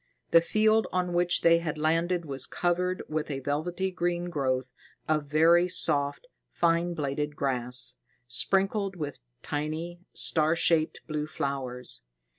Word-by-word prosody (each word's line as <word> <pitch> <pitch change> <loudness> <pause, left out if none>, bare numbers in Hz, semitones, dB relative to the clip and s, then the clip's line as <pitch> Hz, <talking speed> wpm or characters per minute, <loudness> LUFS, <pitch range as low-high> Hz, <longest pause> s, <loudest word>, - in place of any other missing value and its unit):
The 165 - +7
field 215 +5 +2
on 180 -1 -1
which 175 0 +2
they 170 0 +5
had 160 -3 -4
landed 165 +3 +1
was 135 -3 0
covered 180 +1 -1
with 155 0 -3
a 140 - -2
velvety 175 +7 -2
green 175 0 -2
growth 130 -4 -1 0.4
of 155 -1 +1
very 165 +4 +5
soft, 155 - +1 0.2
fine 170 +1 +1
bladed 150 0 -2
grass, 125 -3 +1 0.3
sprinkled 195 - 0
with 150 -5 -5 0.2
tiny, 155 +4 -4
star 160 0 +2
shaped 165 -1 +2
blue 150 -1 -3
flowers. 135 -4 -4
160 Hz, 130 wpm, -28 LUFS, 145-175 Hz, 0.4 s, The